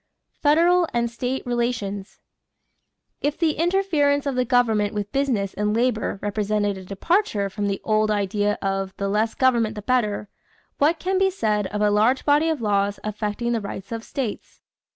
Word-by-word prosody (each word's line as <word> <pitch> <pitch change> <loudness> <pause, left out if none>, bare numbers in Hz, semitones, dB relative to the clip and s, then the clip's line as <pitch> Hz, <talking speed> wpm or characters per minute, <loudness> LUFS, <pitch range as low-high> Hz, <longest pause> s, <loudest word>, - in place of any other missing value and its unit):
=Federal 340 +4 +4
and 235 -1 0
State 250 +3 -3
Relations.= 235 -5 -3 1.0
If 290 0 -1
the 330 -2 +2
interference 315 -4 +1
of 280 - 0
the 250 0 +1
government 225 -4 +2
with 205 -1 -3
business 245 -9 0
and 210 +1 -1
labor 235 -3 0
represented 205 0 0
a 190 - -9
departure 200 - 0
from 205 +1 -2
the 200 -1 -1
old 215 -1 +2
idea 205 0 0
of 195 -1 -2
"the 200 - -2
less 215 +3 0
government 235 -4 +2
the 210 - -7
better," 210 -4 0 0.5
what 310 +4 +3
can 375 +3 0
be 385 0 +4
said 210 - 0
of 210 +2 -4
a 210 0 +3
large 220 +6 +2
body 295 +2 +4
of 315 -6 -1
laws 200 -1 +1
affecting 215 +2 -2
the 230 -2 0
rights 200 0 -7
of 225 -1 -4
states? 245 -5 -5
220 Hz, 170 wpm, -23 LUFS, 205-275 Hz, 1.0 s, =Federal